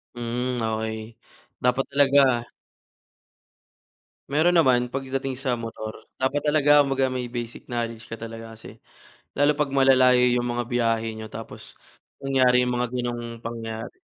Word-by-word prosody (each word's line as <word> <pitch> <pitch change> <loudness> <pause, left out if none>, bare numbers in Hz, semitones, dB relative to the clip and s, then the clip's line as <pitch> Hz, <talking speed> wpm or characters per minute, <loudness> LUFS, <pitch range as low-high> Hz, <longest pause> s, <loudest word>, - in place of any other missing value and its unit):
Mm, 120 +1 -2
okey. 110 0 -3 0.5
Dapat 125 +2 +2
talaga 135 -4 +4 1.9
Meron 165 +4 +3
naman 125 -6 +4
pagdating 135 0 -3
sa 125 -3 -2
motor, 110 -1 -7
dapat 130 +2 0
talaga 145 -1 +4
kumbaga 135 -2 +2
may 125 -1 -3
basic 120 -1 -7
knowledge 115 -1 -4
ka 115 - -6
talaga 115 0 -9
kasi, 110 - -13 0.6
lalo 145 +1 +3
'pag 150 - +2
malalayo 130 -2 +5
'yung 120 0 +1
mga 120 0 -1
biyahe 115 -2 +1
niyo 110 - -6
tapos 115 +1 -9 0.6
nangyari 130 -2 +3
'yung 125 - 0
mga 125 0 0
gano'ng 120 -1 -4
pangyayari. 115 - -6
125 Hz, 130 wpm, -24 LUFS, 115-135 Hz, 1.9 s, malalayo